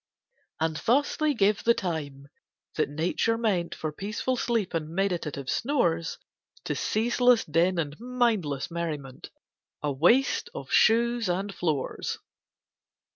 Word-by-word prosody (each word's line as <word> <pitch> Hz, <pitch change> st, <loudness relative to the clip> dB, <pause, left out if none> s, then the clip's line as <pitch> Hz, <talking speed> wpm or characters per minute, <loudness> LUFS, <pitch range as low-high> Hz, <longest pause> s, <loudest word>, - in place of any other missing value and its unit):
And 160 Hz, -1 st, 0 dB
thus 265 Hz, -, +2 dB
they 305 Hz, -2 st, +1 dB
give 205 Hz, -1 st, +2 dB
the 235 Hz, 0 st, +4 dB
time, 145 Hz, -6 st, -4 dB, 0.5 s
that 155 Hz, -, 0 dB
Nature 170 Hz, +9 st, 0 dB
meant 195 Hz, -7 st, 0 dB
For 155 Hz, -, -4 dB
peaceful 210 Hz, +10 st, -2 dB
sleep 230 Hz, -5 st, -1 dB
and 160 Hz, -2 st, -2 dB
meditative 170 Hz, -6 st, -2 dB
snores, 170 Hz, -, 0 dB, 0.5 s
To -, -, -2 dB
ceaseless 240 Hz, +1 st, +2 dB
din 170 Hz, +4 st, +2 dB
and 150 Hz, -1 st, -3 dB
mindless 225 Hz, -, 0 dB
merriment 150 Hz, -6 st, -5 dB, 0.5 s
And 140 Hz, -3 st, -2 dB
waste 245 Hz, -, +3 dB
of -, -, -7 dB
shoes 235 Hz, -1 st, +3 dB
and 195 Hz, +3 st, -1 dB
floors. 155 Hz, -7 st, -2 dB
180 Hz, 125 wpm, -27 LUFS, 155-230 Hz, 0.5 s, the